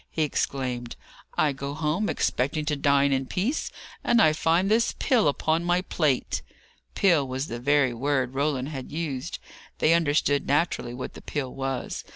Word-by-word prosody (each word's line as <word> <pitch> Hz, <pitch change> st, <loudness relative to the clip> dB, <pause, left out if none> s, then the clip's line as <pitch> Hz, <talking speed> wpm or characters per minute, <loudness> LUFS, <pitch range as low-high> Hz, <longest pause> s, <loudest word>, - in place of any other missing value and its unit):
he 160 Hz, -, 0 dB
exclaimed. 125 Hz, -4 st, -2 dB, 0.4 s
"I 150 Hz, -, +3 dB
go 140 Hz, +1 st, -5 dB
home, 160 Hz, +7 st, 0 dB
expecting 140 Hz, +5 st, 0 dB
to 150 Hz, -1 st, 0 dB
dine 140 Hz, 0 st, +3 dB
in 135 Hz, 0 st, -1 dB
peace, 220 Hz, -, -1 dB, 0.3 s
and 235 Hz, -, +3 dB
I 155 Hz, -8 st, +5 dB
find 165 Hz, +4 st, +2 dB
this 225 Hz, +3 st, +2 dB
pill 245 Hz, -, +3 dB
upon 160 Hz, +3 st, +1 dB
my 175 Hz, +1 st, +1 dB
plate!" 150 Hz, -8 st, 0 dB, 0.5 s
Pill 170 Hz, -8 st, +3 dB
was 130 Hz, +2 st, -3 dB
the 120 Hz, -, -4 dB
very 140 Hz, 0 st, +3 dB
word 130 Hz, +1 st, 0 dB
Roland 140 Hz, -1 st, -1 dB
had 135 Hz, -4 st, -7 dB
used. 150 Hz, -2 st, -3 dB, 0.4 s
They 160 Hz, -, +4 dB
understood, 145 Hz, -3 st, +2 dB
naturally, 140 Hz, -4 st, 0 dB
what 130 Hz, -, -6 dB
the -, -, -11 dB
pill 135 Hz, -4 st, -4 dB
was. 135 Hz, -2 st, -3 dB
145 Hz, 165 wpm, -26 LUFS, 135-165 Hz, 0.5 s, I